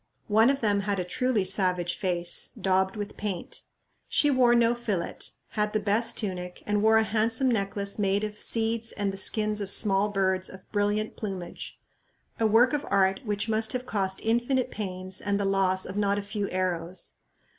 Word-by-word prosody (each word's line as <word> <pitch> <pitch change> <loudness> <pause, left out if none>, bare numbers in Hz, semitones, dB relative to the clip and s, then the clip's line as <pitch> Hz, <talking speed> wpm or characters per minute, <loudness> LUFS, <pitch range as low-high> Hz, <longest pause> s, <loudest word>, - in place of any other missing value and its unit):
One 220 +4 +5
of 275 0 +1
them 205 -2 +2
had 200 0 -1
a - - 0
truly 220 +2 0
savage 180 -2 +1
face, 175 -3 0
daubed 190 0 +1
with 205 -1 -6
paint. 195 -5 -4 0.5
She 290 - +3
wore 250 -2 +5
no 235 0 +4
fillet, 210 -8 -3 0.3
had 210 0 -1
the 215 - +2
best 210 +3 +1
tunic, 180 -4 -4
and 210 0 +1
wore 220 +1 +5
a 220 - +4
handsome 225 +4 +1
necklace 200 -1 -1
made 200 0 +1
of 210 0 -5
seeds 230 0 0
and 200 -2 -2
the - - -6
skins 210 +1 +1
of 200 - -3
small 200 0 +3
birds 190 -2 0
of 185 0 -13
brilliant 205 +1 0
plumage, 190 -5 -6 0.6
a 225 - +3
work 235 +6 +5
of 295 -1 0
art 190 0 +3
which 205 0 -1
must 220 0 0
have 250 0 -3
cost 190 -4 -2
infinite 240 +3 +1
pains 185 -2 -5
and 200 0 0
the 200 - 0
loss 190 -1 +2
of 185 - -6
not 200 -1 +1
a 205 - -2
few 205 0 -3
arrows. 180 -1 -2
205 Hz, 185 wpm, -27 LUFS, 190-220 Hz, 0.6 s, One